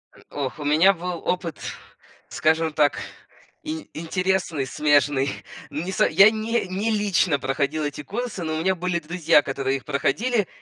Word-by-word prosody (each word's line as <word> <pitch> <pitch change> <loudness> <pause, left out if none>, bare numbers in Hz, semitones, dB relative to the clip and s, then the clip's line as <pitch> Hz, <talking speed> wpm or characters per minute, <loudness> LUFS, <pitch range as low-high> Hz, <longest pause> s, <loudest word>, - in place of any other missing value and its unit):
М, - - -18
ох, 140 0 -4
у - - -5
меня 160 +7 +5
был 180 0 -5
опыт, 175 - -2 0.7
скажем 160 +10 +1
так, 145 -9 +2 0.6
ин 160 +1 -5
интересный, 175 -3 -1
смежный. 145 -1 +2 0.4
Не 155 +6 -4
со - - +3
я 195 +7 +6
не 220 -1 -1
не 195 +5 -1
лично 195 -8 +1
проходил 140 +3 -1
эти 145 0 -4
курсы, 225 0 -4
но 160 -1 -2
у - - -2
меня 190 +3 +1
были 180 0 -1
друзья, 170 -1 +3
которые 135 -1 -2
их 135 - -14
проходили. 215 - 0
165 Hz, 160 wpm, -23 LUFS, 145-190 Hz, 0.7 s, я